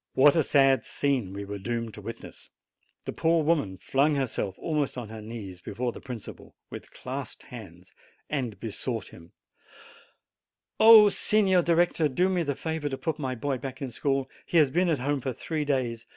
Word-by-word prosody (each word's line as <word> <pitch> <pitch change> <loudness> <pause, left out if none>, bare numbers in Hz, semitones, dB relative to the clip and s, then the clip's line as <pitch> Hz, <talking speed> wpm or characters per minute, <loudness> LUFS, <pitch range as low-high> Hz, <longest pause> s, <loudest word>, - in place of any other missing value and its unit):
What 140 +2 +6
a 165 - +4
sad 135 -2 +4
scene 135 -9 -1
we 100 +1 -6
were 100 0 -6
doomed 115 +1 -3
to - - -10
witness! - - -9 0.6
The - - -4
poor 165 0 +2
woman 145 - +1
flung 140 +8 +1
her 135 -1 +1
self 100 -5 -4
almost 150 -5 -2
on 120 -4 -6
her 110 0 -8
knees 105 -5 -8
before 120 +6 -3
the - - -11
principal, 125 -5 -9 0.2
with - - -9
clasped 130 -1 -7
hands, 95 -6 -12 0.3
and 125 -9 -3
besought 115 0 -4
him: 85 +1 -15 1.5
"Oh, 220 -1 +9
Signor 195 -3 +3
Director, 170 -2 +2
do 180 +8 +1
me 185 -2 +1
the 145 -4 -1
favor 160 -1 -3
to 135 - -4
put 160 +1 -3
my 130 -3 -2
boy 135 +2 -2
back 135 0 -7
in 135 -3 -5
school! 135 +2 -1 0.2
He 170 - +1
has 150 -4 +5
been 180 +3 +2
at 160 - +2
home 140 +2 -1
for 130 0 -3
three 155 +5 -3
days. 120 -5 -1
135 Hz, 185 wpm, -27 LUFS, 115-155 Hz, 1.5 s, Oh